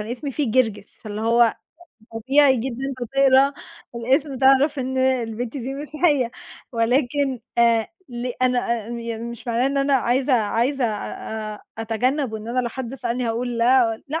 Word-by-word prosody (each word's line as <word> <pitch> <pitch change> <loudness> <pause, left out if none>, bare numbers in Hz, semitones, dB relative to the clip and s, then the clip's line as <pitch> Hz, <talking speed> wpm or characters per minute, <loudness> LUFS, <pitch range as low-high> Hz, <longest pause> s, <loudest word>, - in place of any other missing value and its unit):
أنا 215 +3 -4
إسمي 275 +3 -5
فيه 275 -2 -1
جرجس، 220 -4 0
فاللي 210 -1 -6
هو 230 +1 +4 0.6
طبيعي 265 +4 +4
جدًا 265 +3 -3
هتقرا 270 +2 +4 0.4
الإسم 265 +4 0
تعرف 270 +2 +4
إن 260 0 -2
البنت 245 -2 -1
دي 270 +1 -4
مسيحية 290 -3 0 0.4
ولكن 255 +2 +1 0.2
آآ 230 -1 +4 0.2
ليه 245 0 -4
أنا 250 -1 +3 0.3
آآ - - -10
يعني 230 -1 -5
مش 235 0 -8
معناه 235 +2 +1
إن 275 +1 -1
أنا 275 0 +2
عايزة 260 +1 +1
عايزة 240 +4 +1
أ 215 0 -4
أ 210 - -13 0.2
أتجنب 245 +4 -1
وإن 220 +1 -6
أنا 255 +2 0
لو 240 - -2
حد 255 +1 -6
سألني 245 -2 -2
هاقول 235 +1 -2
لا، 235 -2 +3
لأ 315 +3 -2
245 Hz, 160 wpm, -22 LUFS, 230-270 Hz, 0.6 s, هو